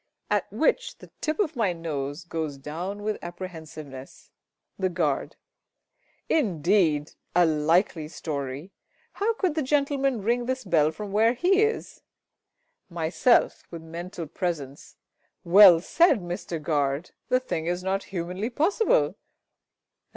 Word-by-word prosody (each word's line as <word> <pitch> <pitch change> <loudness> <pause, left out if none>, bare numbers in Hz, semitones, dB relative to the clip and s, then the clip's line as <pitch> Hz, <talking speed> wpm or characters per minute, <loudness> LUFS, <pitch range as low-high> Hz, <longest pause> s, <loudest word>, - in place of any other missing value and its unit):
[At - - 0
which - - 0
the - - -15
tip 310 0 -1
of 325 -7 0
my 215 -7 +1
nose 150 -2 -4
goes 160 -4 -4
down 175 +9 -5
with 215 0 -2
apprehensiveness. 160 -6 -9 0.5
The 190 -1 +1
Guard. 165 -6 -1 0.9
Indeed! 175 - +2 0.2
A 175 0 +6
likely 160 +1 +1
story! 145 +1 -5 0.4
How 445 +3 0
could 370 -7 0
the 310 - -1
gentleman 275 -4 +1
ring 240 +3 0
this 260 0 -2
bell 160 -6 +3
from 200 +5 -7
where 220 +3 +4
he 375 - +3
is? 440 +1 -1 0.9
Myself 175 +9 +2
(with 165 -1 -8
mental 170 +1 -6
presence). 150 -5 -5 0.5
Well 180 -1 +8
said, 315 - +3
Mister 175 -1 -4
GUARD! 145 0 -1 0.2
The 255 - +4
thing 165 -10 -4
is 175 +1 -1
not 190 +1 -1
humanly 185 +4 -4
possible. 410 - +2
180 Hz, 125 wpm, -26 LUFS, 160-240 Hz, 0.9 s, Well